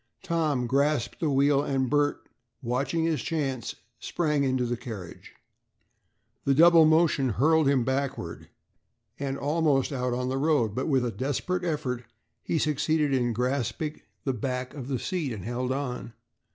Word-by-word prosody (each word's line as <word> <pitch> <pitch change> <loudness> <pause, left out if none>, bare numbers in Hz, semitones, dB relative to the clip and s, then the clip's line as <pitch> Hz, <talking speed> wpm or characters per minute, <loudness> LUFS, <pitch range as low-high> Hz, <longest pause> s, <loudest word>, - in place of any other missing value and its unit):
Tom 160 -8 0
grasped 140 0 +1
the 160 - 0
wheel 140 0 +3
and 135 -2 0
Bert, 145 +1 0 0.4
watching 135 +7 0
his 160 -5 0
chance, 135 - -2 0.2
sprang 150 -4 0
into 130 -2 +1
the 120 0 -1
carriage. 110 -8 -9 1.1
The 135 - +2
double 165 +1 +7
motion 155 -4 +3
hurled 155 +7 +3
him 135 -4 +3
backward 135 +1 -3 0.7
and 135 -1 -2
almost 145 -2 +1
out 125 -2 -1
on 125 0 -2
the 130 +1 -1
road, 140 -8 +2
but 130 - -2
with 135 -5 +2
a 120 - -1
desperate 145 +9 -2
effort, 130 -7 -2 0.4
he 165 - -1
succeeded 150 -1 +1
in 120 -2 +1
grasping 125 +5 -2 0.2
the 135 - 0
back 125 +2 -3
of 135 -4 -7
the 135 -2 -1
seat 165 -3 -2
and 100 -4 -7
held 125 +2 -2
on. 125 -4 -4
135 Hz, 150 wpm, -27 LUFS, 125-150 Hz, 1.1 s, double